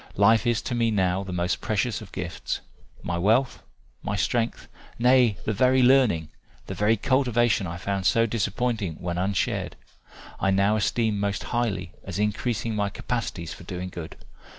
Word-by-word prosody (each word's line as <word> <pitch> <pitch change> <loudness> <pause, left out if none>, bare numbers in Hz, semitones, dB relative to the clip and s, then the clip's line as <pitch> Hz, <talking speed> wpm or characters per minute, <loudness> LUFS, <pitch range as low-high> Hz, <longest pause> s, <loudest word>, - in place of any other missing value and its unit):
Life 110 +3 +4
is 120 -2 +1
to 130 - -3
me 115 -1 +2
now 95 -3 +1
the 95 - -7
most 90 0 -1
precious 110 +2 -1
of - - -11
gifts - - -4 0.4
my 85 0 -2
wealth, 115 +8 +2 0.4
my 105 - -2
strength, 115 +3 -1 0.3
nay 125 -3 +4
the 110 - 0
very 130 +4 +4
learning, 125 - +4 0.4
the - - -5
very 110 +2 +2
cultivation 120 -4 +2
I 85 +1 -5
found 95 +1 -1
so 115 +3 +4
disappointing 110 -4 -1
when 85 -1 -3
unshared, 95 +1 -1 0.6
I 95 - +1
now 100 +2 +3
esteem 110 0 0
most 100 0 -1
highly 100 -8 -2
as - - -5
increasing 110 +2 -1
my 100 -1 0
capacities 100 -7 -4
for - - -12
doing 90 +1 -5
good. 85 -3 -8
105 Hz, 160 wpm, -25 LUFS, 95-120 Hz, 0.6 s, Life